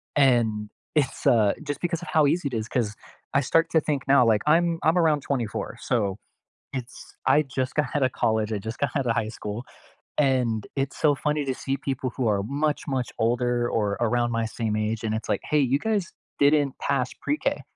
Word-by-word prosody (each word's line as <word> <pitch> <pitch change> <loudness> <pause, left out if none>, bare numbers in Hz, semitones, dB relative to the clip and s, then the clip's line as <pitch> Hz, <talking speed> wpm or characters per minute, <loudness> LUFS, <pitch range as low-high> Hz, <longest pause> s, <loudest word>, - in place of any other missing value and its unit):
and, 115 -6 +3 0.3
it's 140 -3 0
uh, 110 -4 +5
just 145 -1 -4
because 170 -1 -1
of 175 - -8
how 155 -2 +4
easy 160 +1 +1
it - - -13
is 110 - -5
'cause 110 -4 -1 0.4
I 140 - +4
start 165 +5 +2
to 160 - +4
think 145 -3 -2
now, 140 -1 +6
like, 110 -2 +3
I'm 165 +2 +3
I'm 160 +3 +3
around 160 -4 +3
24, 125 -6 -3
so, 100 -5 0 0.6
it's 130 -2 -8
I 150 - +5
just 130 -2 -3
got 150 -3 +1
outta 130 -3 +2
college. 110 -1 0
I 105 - 0
just 110 +3 -6
got 140 - 0
outta 125 -5 +1
high 115 -2 0
school. 105 +4 -5 0.5
And 125 -7 +2
it's 135 -1 -2
so 150 -2 +4
funny 150 +1 -1
to 130 - 0
see 135 +1 -2
people 130 -1 -3
who 130 - 0
are 100 -2 +1
much, 145 +5 -1
much 130 -4 -1
older, 120 +1 +1
or 105 -2 0
around 120 +1 +1
my 115 -1 0
same 110 -1 -2
age, 110 +1 -2
and 110 -1 0
it's 110 - -4
like, - - +1
"Hey, 150 -1 +4
you 140 - +4
guys 210 +2 0 0.3
didn't 145 -1 +3
pass 135 -3 0
Pre-K," 300 +1 -1
130 Hz, 205 wpm, -25 LUFS, 115-145 Hz, 0.6 s, now